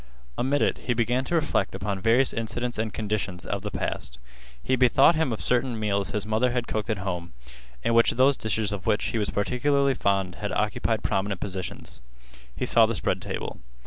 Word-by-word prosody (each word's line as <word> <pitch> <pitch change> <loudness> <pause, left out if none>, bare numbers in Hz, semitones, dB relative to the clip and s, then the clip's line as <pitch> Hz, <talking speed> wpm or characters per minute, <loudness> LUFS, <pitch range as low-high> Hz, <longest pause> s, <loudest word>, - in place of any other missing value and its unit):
Amid 140 +3 +1
it - - +1
he 120 - +2
began 120 +2 +1
to 170 - -1
reflect 155 - 0
upon 100 0 -3
various 120 +5 +3
incidents 120 +1 -3
and 110 -1 -1
conditions 100 -4 -3
of 100 -1 -3
the 105 - -4
past. 60 -9 -3 0.5
He 130 - +2
bethought 125 +6 +5
him 160 -5 0
of 110 - -4
certain 125 -2 +1
meals 100 -3 0
his 105 +6 -1
mother 110 +3 +2
had 120 -1 -2
cooked 110 +1 -3
at 110 - 0
home, 90 -3 -4 0.5
in 115 - +1
which 115 0 +5
those 135 +3 +4
dishes 110 -2 0
of 100 -4 -5
which 105 - +2
he 115 - -1
was 105 - -1
particularly 140 +6 +1
fond 95 -6 0
had - - -2
occupied - - 0
prominent 95 -1 -1
positions. 95 -9 -5 0.5
He - - -2
saw - - +5
the - - -2
spread - - -1
table. - - -5
110 Hz, 195 wpm, -26 LUFS, 100-125 Hz, 0.5 s, bethought